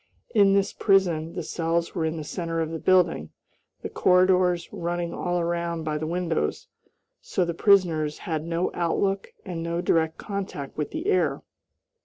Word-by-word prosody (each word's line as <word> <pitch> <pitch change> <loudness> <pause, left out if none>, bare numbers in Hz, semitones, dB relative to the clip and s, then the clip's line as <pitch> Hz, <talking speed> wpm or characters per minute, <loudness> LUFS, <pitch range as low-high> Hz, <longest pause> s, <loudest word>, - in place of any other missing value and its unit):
In 200 -3 +5
this 200 0 +2
prison 175 -5 +2
the 175 - -3
cells 165 +1 -1
were 165 -3 -1
in 160 +1 -2
the 155 - -4
center 165 +1 -3
of 160 -1 -1
the 165 - -4
building, 175 - +2 0.5
the - - -3
corridors 180 -1 +3
running 170 0 -3
all 175 0 -1
around 170 -1 -2
by 155 -1 -2
the 155 - -3
windows, 170 - -1 0.5
so 180 - 0
the 170 - -2
prisoners 165 -6 +3
had 160 -3 -2
no 170 +2 -1
outlook 195 +3 0
and 175 -3 -4
no 170 +1 -2
direct 160 -2 +1
contact 195 -9 -5
with 150 - -2
the - - -5
air. 155 -7 +1
170 Hz, 165 wpm, -25 LUFS, 160-180 Hz, 0.5 s, In